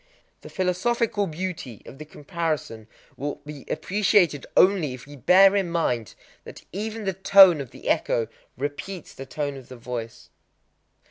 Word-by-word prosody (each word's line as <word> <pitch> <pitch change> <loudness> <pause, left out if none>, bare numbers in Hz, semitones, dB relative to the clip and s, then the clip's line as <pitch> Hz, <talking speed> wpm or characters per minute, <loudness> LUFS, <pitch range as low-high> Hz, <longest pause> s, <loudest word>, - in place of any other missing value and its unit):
The - - -11
philosophical 205 +3 0
beauty 165 - -6
of 135 - -12
the 155 - -8
comparison 150 - -4 0.3
will 145 +2 -3
be 150 -2 -9
appreciated 185 -7 +1
only 180 -9 +4
if 125 -1 -13
we 145 +1 -12
bear 190 +8 +5
in 195 -3 0
mind 125 - -1 0.3
that - - -12
even 215 +4 -5
the 195 -1 -1
tone 190 -3 +6
of 135 - -8
the - - -12
echo 115 -1 +1 0.3
repeats 150 +7 -6
the 135 - -9
tone 145 -2 -3
of 130 - -13
the 130 - -10
voice. 115 -1 -7
160 Hz, 150 wpm, -24 LUFS, 135-190 Hz, 0.3 s, tone